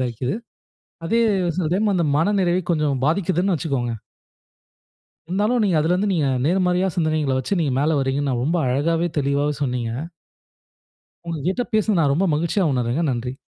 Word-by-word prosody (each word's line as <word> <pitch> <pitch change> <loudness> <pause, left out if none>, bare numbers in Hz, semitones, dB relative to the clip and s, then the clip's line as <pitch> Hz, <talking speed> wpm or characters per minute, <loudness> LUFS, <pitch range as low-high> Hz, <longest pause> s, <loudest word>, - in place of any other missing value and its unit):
தான் 125 - 0
இருக்குது. 125 - -3 0.7
அதே 230 +6 +2 0.4
சில 180 - 0
டைம் 205 +1 +1
அந்த 170 -3 +1
மன 205 +6 +2
நிறைவை 180 0 +1
கொஞ்சம் 150 -4 0
பாதிக்குதுன்னு 185 +2 +1
வச்சுக்கோங்க. 135 -7 -2 1.4
இருந்தாலும், 210 +7 +1
நீங்க 190 -5 +2
அதிலருந்து 180 +6 +1
நீங்க 155 -5 +1 0.2
நேர்மறையா 180 +2 +2
சிந்தனைகளை 155 -5 0
வச்சு, 180 +9 -1
நீங்க 140 -5 0
மேல 150 +1 +2
வர்றீங்கன்னு 135 +1 -1
நான் 120 0 -1
ரொம்ப 165 +5 0
அழகாவே 165 +6 +1
தெளிவாவே 140 +1 0
சொன்னீங்க. 125 -3 -2 1.4
உங்க 165 -2 -3
கிட்ட 220 +7 0
பேசுனது 215 -4 +2
நான் 145 -3 +3
ரொம்ப 185 +7 +1
மகிழ்ச்சியா 170 +5 0
உணர்றேங்க. 125 +5 0
நன்றி. 125 +1 -3
160 Hz, 150 wpm, -22 LUFS, 140-185 Hz, 1.4 s, நான்